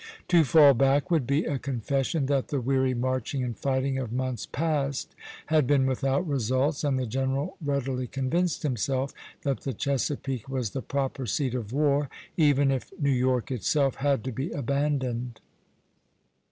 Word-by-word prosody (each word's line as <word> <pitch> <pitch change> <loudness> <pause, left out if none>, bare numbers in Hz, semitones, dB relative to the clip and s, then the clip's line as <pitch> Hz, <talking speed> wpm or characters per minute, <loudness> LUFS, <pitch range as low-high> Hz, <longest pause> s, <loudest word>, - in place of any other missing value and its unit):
To 170 -2 +6
fall 150 -1 +7
back 135 +6 +2
would 155 -8 +2
be 140 +3 +1
a 140 -3 -1
confession 135 +3 -1
that 135 -1 0
the 145 - -1
weary 130 0 +1
marching 130 +2 -1
and 120 -2 -3
fighting 135 +1 0
of 125 -4 -4
months 130 -2 -2
past 145 -3 -1 0.3
had 155 -4 +2
been 140 -1 +3
without 135 +5 0
results, 135 +2 0
and 140 -3 +1
the 130 - -1
general 135 +6 -1
readily 135 -3 -1
convinced 150 +8 -1
himself 135 0 -1 0.3
that 140 -2 0
the 135 - -3
Chesapeake 135 0 -2
was 130 -6 -2
the 135 - -3
proper 135 -2 -2
seat 130 +3 0
of 115 -4 -4
war, 145 0 +2 0.3
even 145 -3 +4
if 135 -2 -3
New 140 -2 +2
York 125 0 +1
itself 135 +3 +1
had 140 -4 +1
to 130 - -3
be 130 +7 -3
abandoned. 130 -4 -1
135 Hz, 160 wpm, -27 LUFS, 130-145 Hz, 0.3 s, fall